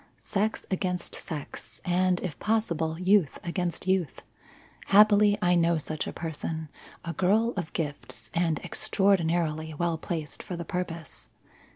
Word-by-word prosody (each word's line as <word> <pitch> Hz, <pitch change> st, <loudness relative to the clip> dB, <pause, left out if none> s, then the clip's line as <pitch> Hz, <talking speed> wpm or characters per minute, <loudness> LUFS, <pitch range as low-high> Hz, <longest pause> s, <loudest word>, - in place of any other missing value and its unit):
Sex 215 Hz, +2 st, -1 dB
against 180 Hz, -2 st, -1 dB
sex, 150 Hz, -4 st, -7 dB
and, 180 Hz, 0 st, +2 dB
if 165 Hz, -7 st, -5 dB
possible, 170 Hz, -8 st, 0 dB
youth 185 Hz, -4 st, +3 dB
against 175 Hz, 0 st, -2 dB
youth. 185 Hz, -6 st, 0 dB, 0.6 s
Happily, 205 Hz, 0 st, +6 dB
I 180 Hz, 0 st, +4 dB
know 170 Hz, -1 st, +3 dB
such 155 Hz, 0 st, -3 dB
a -, -, -3 dB
person 160 Hz, -1 st, -4 dB, 0.4 s
a 170 Hz, -, -3 dB
girl 215 Hz, +7 st, +2 dB
of 175 Hz, -5 st, -3 dB
gifts 140 Hz, -8 st, -4 dB
and 165 Hz, -2 st, +1 dB
extraordinarily 165 Hz, -5 st, +1 dB
well 170 Hz, 0 st, 0 dB
placed 160 Hz, -3 st, -4 dB
for 180 Hz, -, -6 dB
the 170 Hz, 0 st, -5 dB
purpose. 170 Hz, -2 st, -4 dB
175 Hz, 135 wpm, -28 LUFS, 160-190 Hz, 0.6 s, Happily